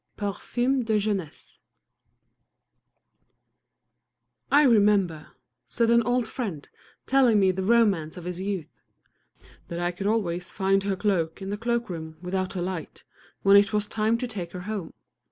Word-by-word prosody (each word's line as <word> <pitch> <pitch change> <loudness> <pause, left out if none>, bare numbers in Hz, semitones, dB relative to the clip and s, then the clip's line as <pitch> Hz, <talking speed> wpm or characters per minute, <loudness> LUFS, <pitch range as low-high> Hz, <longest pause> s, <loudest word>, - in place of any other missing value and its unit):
Parfum 240 +6 -1
de 220 -1 +1
Jeunesse 200 -7 -4 2.9
"I 290 +2 +5
remember," 205 - +3 0.3
said 230 -1 +1
an 235 0 +5
old 245 0 0
friend, 200 - -5 0.4
telling 255 -5 +4
me 190 -1 +4
the 190 +1 -4
romance 195 -7 +2
of 180 - -8
his 180 +1 -5
youth, 190 -5 -5 0.9
"that 170 - -5
I 175 0 0
could 195 +3 -4
always 180 -5 -1
find 195 0 +1
her 200 -1 0
cloak 180 -5 -1
in 195 0 -5
the - - -1
cloak 235 +1 -1
room 160 -3 -7
without 185 +2 -3
a 175 - -2
light, 180 -3 -6 0.4
when 195 0 +6
it 200 +1 +5
was 210 -1 +1
time 220 +2 0
to 250 - -3
take 190 -7 -6
her 180 - -6
home. 200 -3 -5
200 Hz, 150 wpm, -26 LUFS, 180-225 Hz, 2.9 s, when